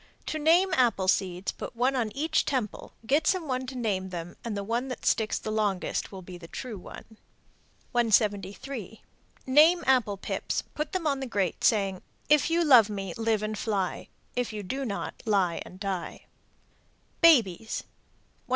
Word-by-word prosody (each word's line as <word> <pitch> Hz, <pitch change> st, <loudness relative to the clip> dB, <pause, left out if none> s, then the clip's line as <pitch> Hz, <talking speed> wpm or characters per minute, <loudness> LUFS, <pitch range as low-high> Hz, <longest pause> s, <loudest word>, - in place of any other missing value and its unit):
To 310 Hz, -, -3 dB
name 340 Hz, +5 st, +4 dB
apple 235 Hz, -9 st, +2 dB
seeds, 185 Hz, 0 st, +1 dB
put -, -, -8 dB
one 255 Hz, +3 st, +1 dB
on 230 Hz, -4 st, 0 dB
each 315 Hz, +2 st, +2 dB
temple, 255 Hz, -8 st, -3 dB
get 290 Hz, +6 st, +2 dB
some 365 Hz, -4 st, +1 dB
one 255 Hz, -1 st, -2 dB
to 260 Hz, -, -6 dB
name 195 Hz, -6 st, -1 dB
them, 175 Hz, -1 st, -6 dB
and 225 Hz, -3 st, -3 dB
the 200 Hz, -, -3 dB
one 235 Hz, +5 st, -1 dB
that 255 Hz, -, -6 dB
sticks 220 Hz, -2 st, +2 dB
the 215 Hz, -, -5 dB
longest 210 Hz, -4 st, -1 dB
will 190 Hz, -2 st, -9 dB
be 180 Hz, 0 st, -10 dB
the 165 Hz, -, -11 dB
true 225 Hz, +2 st, -6 dB
one. 220 Hz, +4 st, -12 dB, 0.7 s
173. 220 Hz, 0 st, 0 dB, 0.4 s
Name 310 Hz, +6 st, +5 dB
apple 245 Hz, -6 st, +3 dB
pips, -, -, -3 dB
put 300 Hz, 0 st, -4 dB
them 370 Hz, -3 st, -2 dB
on 280 Hz, -3 st, +1 dB
the 265 Hz, -, -4 dB
grate, 200 Hz, -7 st, -1 dB
saying, 195 Hz, -4 st, +2 dB, 0.3 s
If 300 Hz, +2 st, +4 dB
you 335 Hz, +1 st, +2 dB
love 245 Hz, -8 st, +7 dB
me, 195 Hz, -4 st, -4 dB
live 225 Hz, -2 st, 0 dB
and 215 Hz, 0 st, -2 dB
fly; 200 Hz, -3 st, -2 dB, 0.3 s
If 245 Hz, -2 st, -1 dB
you 210 Hz, -1 st, -5 dB
do 265 Hz, +8 st, -3 dB
not, 200 Hz, -4 st, -5 dB
lie 190 Hz, -5 st, +2 dB
and 185 Hz, -, -13 dB
die. 195 Hz, -3 st, -4 dB, 1.0 s
BABIES. 225 Hz, -, +4 dB
174. -, -, -34 dB
225 Hz, 170 wpm, -28 LUFS, 195-270 Hz, 1.0 s, love